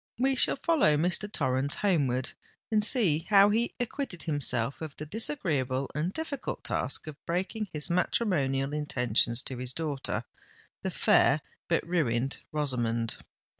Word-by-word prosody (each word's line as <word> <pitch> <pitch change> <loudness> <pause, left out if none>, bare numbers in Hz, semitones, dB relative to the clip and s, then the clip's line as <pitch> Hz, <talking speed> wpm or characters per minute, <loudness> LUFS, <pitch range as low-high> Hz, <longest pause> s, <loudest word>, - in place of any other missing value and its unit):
We 265 +3 +3
shall 260 - +5
follow 275 - +3
Mr. 180 +6 0
Torrens 135 -4 0
homeward, 140 -11 +1 0.4
and 215 -1 +3
see 180 - +3
how 200 0 +7
he 230 +3 0
acquitted 245 - -4
himself 135 -5 -1
of 155 -3 -6
the 150 - -7
disagreeable 145 - -1
and 155 +5 -1
difficult 310 +2 -4
task - - -1
of 155 -2 -10
breaking 190 +5 -2
his 150 -1 -4
matrimonial 145 - +1
intentions 125 -5 +1
to 130 - -5
his 125 0 -4
daughter, 150 -3 -2 0.6
the - - -2
fair - - +4 0.3
but - - +1
ruined 135 -7 0
Rosamond. 120 -6 -1
150 Hz, 135 wpm, -29 LUFS, 135-200 Hz, 0.6 s, how